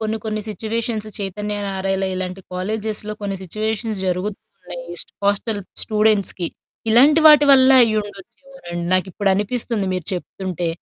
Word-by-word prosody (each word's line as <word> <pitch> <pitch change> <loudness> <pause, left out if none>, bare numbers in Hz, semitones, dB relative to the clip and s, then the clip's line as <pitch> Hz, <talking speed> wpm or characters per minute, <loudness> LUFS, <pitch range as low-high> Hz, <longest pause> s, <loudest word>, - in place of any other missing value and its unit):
కొన్ని 220 0 -2
కొన్ని 215 -1 -2
సిట్యుయేషన్స్‌ 220 0 -3
'చైతన్య', 205 +1 -4
'నారాయణా' 195 0 -1
ఇలాంటి 185 +1 -4
కాలేజెస్‌లో 215 +3 -3
కొన్ని 200 -1 -3
సిట్యుయేషన్స్ 215 +2 -3
జరుగుతున్నాయి. 200 - -5 0.4
హోస్టల్ 205 +1 0 0.2
స్టూడెంట్స్‌కి 210 -5 +2 0.4
ఇలాంటి 285 +7 +6
వాటి 300 -1 +8
వల్ల 260 -1 +6
అయ్యుండొచ్చు 205 -2 -4 0.3
రన్ 175 0 -4
నాకిప్పుడు 190 +2 0
అనిపిస్తుంది 210 0 -1
మీరు 185 -2 -3
చెప్తుంటే. 180 -1 -4
210 Hz, 115 wpm, -20 LUFS, 190-220 Hz, 0.4 s, వాటి